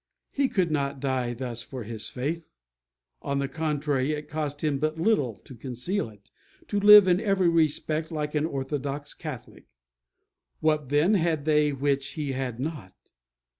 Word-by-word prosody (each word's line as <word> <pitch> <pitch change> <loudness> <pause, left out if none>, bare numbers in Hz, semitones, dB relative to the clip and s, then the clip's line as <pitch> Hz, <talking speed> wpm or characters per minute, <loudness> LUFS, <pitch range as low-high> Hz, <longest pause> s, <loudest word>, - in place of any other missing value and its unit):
He 275 -1 +1
could 180 -5 +1
not 140 -2 -1
die 130 -3 -1
thus 120 -1 -4
for 125 +1 -7
his 110 0 -5
faith. 155 +6 -4 0.7
On 140 -1 -2
the 140 0 0
contrary, 150 -2 -1
it 150 0 -5
cost 150 -1 -4
him 145 -3 +1
but 155 +2 -1
little 160 - +2
to 135 - -11
conceal 125 - -3
it, 105 -2 -20 0.4
to 205 - +1
live 205 -1 +9
in 180 0 +4
every 195 -4 +2
respect 155 -1 +1
like 150 -2 -3
an 150 +1 +1
orthodox 140 0 -4
Catholic. 145 - -9 0.9
What, 155 -3 +1
then, 150 +8 +3
had 165 -6 +1
they 150 -1 +3
which 140 0 -1
he 150 -3 -3
had 130 -3 -3
not? 135 - -5
145 Hz, 160 wpm, -27 LUFS, 135-160 Hz, 0.9 s, live